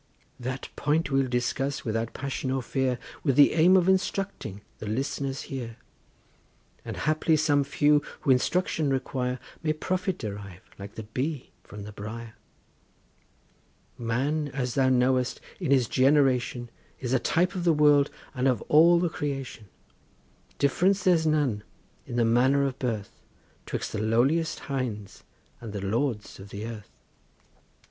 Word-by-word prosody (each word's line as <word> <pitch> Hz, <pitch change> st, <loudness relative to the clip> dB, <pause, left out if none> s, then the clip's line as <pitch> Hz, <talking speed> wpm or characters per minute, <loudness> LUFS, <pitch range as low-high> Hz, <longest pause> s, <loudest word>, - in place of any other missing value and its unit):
That 130 Hz, +1 st, -4 dB
point 150 Hz, +2 st, 0 dB
we'll 135 Hz, -1 st, +2 dB
discuss 125 Hz, +3 st, -1 dB
without 115 Hz, 0 st, -2 dB
passion 135 Hz, -1 st, -3 dB
or 130 Hz, -1 st, -1 dB
fear 130 Hz, 0 st, 0 dB, 0.3 s
With 135 Hz, -5 st, +2 dB
the 145 Hz, 0 st, +7 dB
aim 175 Hz, +4 st, +6 dB
of 180 Hz, -1 st, +2 dB
instructing 190 Hz, -, -1 dB, 0.2 s
the 110 Hz, -, -6 dB
listeners 135 Hz, +4 st, -2 dB
here; 125 Hz, -5 st, -6 dB, 1.1 s
And -, -, -6 dB
haply 155 Hz, +1 st, +2 dB
some 145 Hz, -2 st, +3 dB
few 145 Hz, +1 st, +3 dB, 0.2 s
who 135 Hz, -, +2 dB
instruction 155 Hz, +3 st, +1 dB
require 130 Hz, -1 st, -1 dB, 0.2 s
May 155 Hz, -1 st, +1 dB
profit 185 Hz, +3 st, -2 dB
derive 100 Hz, -, -7 dB, 0.2 s
like 100 Hz, +1 st, -9 dB
the 110 Hz, -, -6 dB
bee 130 Hz, +6 st, -4 dB
from 105 Hz, -1 st, -9 dB
the 105 Hz, -, -8 dB
briar. 110 Hz, +2 st, -7 dB, 1.6 s
Man 135 Hz, +6 st, -1 dB
as 125 Hz, -3 st, -1 dB
thou 130 Hz, -1 st, +3 dB
knowest, 125 Hz, 0 st, +2 dB, 0.2 s
in -, -, -2 dB
his 130 Hz, -4 st, +4 dB
generation 130 Hz, -3 st, +2 dB, 0.3 s
Is 125 Hz, -1 st, -2 dB
a 130 Hz, -, +4 dB
type 180 Hz, +8 st, +1 dB
of 185 Hz, -3 st, -3 dB
the 170 Hz, -, +4 dB
world 150 Hz, -2 st, +5 dB, 0.2 s
and 130 Hz, 0 st, 0 dB
of 125 Hz, -5 st, +1 dB
all 170 Hz, +3 st, +7 dB
the 175 Hz, -, +1 dB
creation; 135 Hz, -8 st, -5 dB, 0.9 s
Difference 180 Hz, +7 st, +2 dB
there's 170 Hz, -3 st, +3 dB
none 145 Hz, -9 st, +1 dB, 0.5 s
in 120 Hz, -, -5 dB
the 120 Hz, -1 st, +3 dB
manner 130 Hz, +5 st, +3 dB
of 135 Hz, -1 st, -3 dB
birth 110 Hz, -5 st, -4 dB, 0.5 s
'Twixt -, -, -3 dB
the 105 Hz, -, -2 dB
lowliest 130 Hz, +9 st, +1 dB
hinds 125 Hz, -8 st, -4 dB, 0.4 s
and 115 Hz, -3 st, -8 dB
the 100 Hz, -, -4 dB
lords 115 Hz, 0 st, -2 dB
of 95 Hz, +1 st, -10 dB
the 100 Hz, +2 st, -6 dB
earth. 110 Hz, -3 st, -8 dB
130 Hz, 145 wpm, -27 LUFS, 115-150 Hz, 1.6 s, the